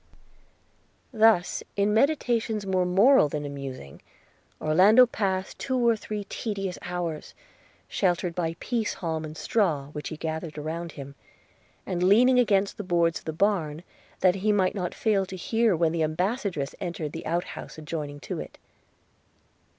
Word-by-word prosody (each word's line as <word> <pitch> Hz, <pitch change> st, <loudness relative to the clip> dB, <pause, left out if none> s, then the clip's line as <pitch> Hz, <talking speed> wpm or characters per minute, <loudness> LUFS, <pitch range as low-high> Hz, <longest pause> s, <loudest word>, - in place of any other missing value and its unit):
Thus, 220 Hz, -5 st, +3 dB
in 205 Hz, +1 st, +2 dB
meditations 230 Hz, -5 st, +1 dB
more 185 Hz, -2 st, +1 dB
moral 195 Hz, -, +5 dB
than 150 Hz, 0 st, -4 dB
amusing, 135 Hz, -, -7 dB, 0.6 s
Orlando 195 Hz, +11 st, +6 dB
passed 190 Hz, -5 st, -2 dB
two 260 Hz, -1 st, -1 dB
or 230 Hz, -, +5 dB
three 210 Hz, -1 st, -5 dB
tedious 195 Hz, -3 st, -4 dB
hours, 175 Hz, -3 st, -4 dB, 0.5 s
sheltered 180 Hz, -2 st, 0 dB
by 165 Hz, -1 st, -2 dB
pease 230 Hz, -3 st, -2 dB
halm 160 Hz, -2 st, -3 dB
and 155 Hz, 0 st, -8 dB
straw, 160 Hz, -11 st, 0 dB
which 150 Hz, 0 st, -6 dB
he 155 Hz, -, -6 dB
gathered 160 Hz, 0 st, -4 dB
around 165 Hz, +3 st, -4 dB
him, 140 Hz, -1 st, -9 dB, 0.7 s
and 180 Hz, -2 st, -3 dB
leaning 245 Hz, +7 st, +5 dB
against 200 Hz, -4 st, +2 dB
the 210 Hz, -, -4 dB
boards 170 Hz, -2 st, +1 dB
of -, -, -23 dB
the 160 Hz, -, -2 dB
barn, 165 Hz, -3 st, 0 dB, 0.4 s
that 185 Hz, -1 st, +5 dB
he 210 Hz, +3 st, +1 dB
might 190 Hz, -3 st, +2 dB
not 180 Hz, -4 st, -3 dB
fail 210 Hz, -3 st, +1 dB
to 190 Hz, -, -7 dB
hear 225 Hz, +3 st, +1 dB
when 165 Hz, -1 st, +2 dB
the 165 Hz, 0 st, -1 dB
ambassadress 180 Hz, -, -1 dB
entered 170 Hz, -5 st, -4 dB
the 165 Hz, -, -7 dB
outhouse 170 Hz, 0 st, -4 dB
adjoining 150 Hz, -2 st, -5 dB
to -, -, -5 dB
it. -, -, -8 dB
180 Hz, 150 wpm, -26 LUFS, 160-210 Hz, 0.7 s, Orlando